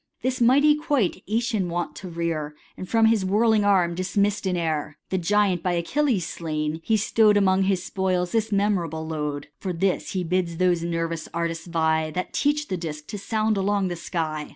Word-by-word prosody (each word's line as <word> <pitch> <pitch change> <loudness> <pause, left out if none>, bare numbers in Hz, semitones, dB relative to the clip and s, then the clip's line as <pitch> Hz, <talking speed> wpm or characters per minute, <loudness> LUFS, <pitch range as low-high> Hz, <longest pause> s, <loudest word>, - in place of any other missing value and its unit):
This 255 -1 -1
mighty 280 +5 +5
quoit 290 - 0
JEtion 220 -3 0
wont 170 -3 -3
to 185 - -7
rear, 165 -3 -3 0.2
And 185 - -8
from 225 -1 +4
his 220 -3 +3
whirling 215 +2 +3
arm 185 -4 +3
dismiss'd 200 +3 0
in 180 -1 0
air; 155 -3 -2
The 190 - +1
giant 195 0 +2
hy 180 - +1
Achilles 205 - 0
slain, 155 -1 -3
he 220 +4 +2
stow'd 210 0 +3
Among 190 -1 +3
his 190 -2 0
spoils 185 -2 -1
this 225 -1 0
memorable 180 -6 0
load. 150 -2 -4
For 190 - -3
this 180 +2 -1
he 185 -2 -1
bids 175 -1 -1
those 180 -1 +2
nervous 165 -1 -3
artists 170 0 -2
vie 160 -2 +1
That 180 +4 -4
teach 295 +1 +1
the 185 - -2
disk 155 -3 -6
to 205 - -5
sound 215 +1 0
along 195 -1 +1
the 175 - -3
sky. 155 -3 -3
185 Hz, 185 wpm, -24 LUFS, 165-210 Hz, 0.2 s, mighty